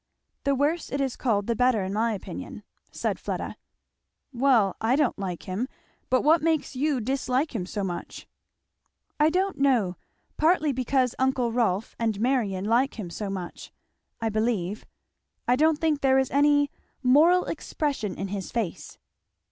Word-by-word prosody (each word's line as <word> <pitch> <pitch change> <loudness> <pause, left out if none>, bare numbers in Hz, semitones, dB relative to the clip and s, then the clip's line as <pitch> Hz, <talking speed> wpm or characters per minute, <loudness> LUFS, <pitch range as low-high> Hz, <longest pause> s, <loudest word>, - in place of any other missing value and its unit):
"The 280 0 +3
worse 300 +5 0
it 280 - -1
is 270 -2 -1
called 210 -6 0
the 235 - 0
better, 245 -4 +2
in 190 +1 -3
my 225 +2 +1
opinion," 200 - -7 0.3
said - - -2
Fleda. - - -4 0.8
"Well, 240 -7 +3
I 230 +3 +3
don't 285 -7 +1
like 185 -3 -4
him; 200 +7 -3 0.4
but 255 - +3
what 320 +3 +5
makes 315 -3 0
you 285 0 +1
dislike 265 +4 -1
him 185 -6 -3
so 205 +1 -3
much?" 175 -2 -6 0.9
"I 300 +1 +5
don't 375 +1 0
know 240 -10 +2 0.4
partly 315 -1 +3
because 255 -1 +1
uncle 260 -2 +1
Rolf 225 -3 0
and 220 -3 0
Marion 220 -6 0
like 240 +5 +2
him 185 -6 -6
so 205 +3 -4
much, 185 -3 -6 0.5
I 225 - 0
believe 215 -2 -1 0.6
I 245 - +4
don't 310 +3 +3
think 305 -2 0
there 265 -1 +4
is 265 -1 +1
any 290 0 +3 0.3
moral 315 +8 +5
expression 275 - -3
in 195 - -4
his 195 -1 -5
face." 220 -8 -4
250 Hz, 155 wpm, -26 LUFS, 210-280 Hz, 0.9 s, what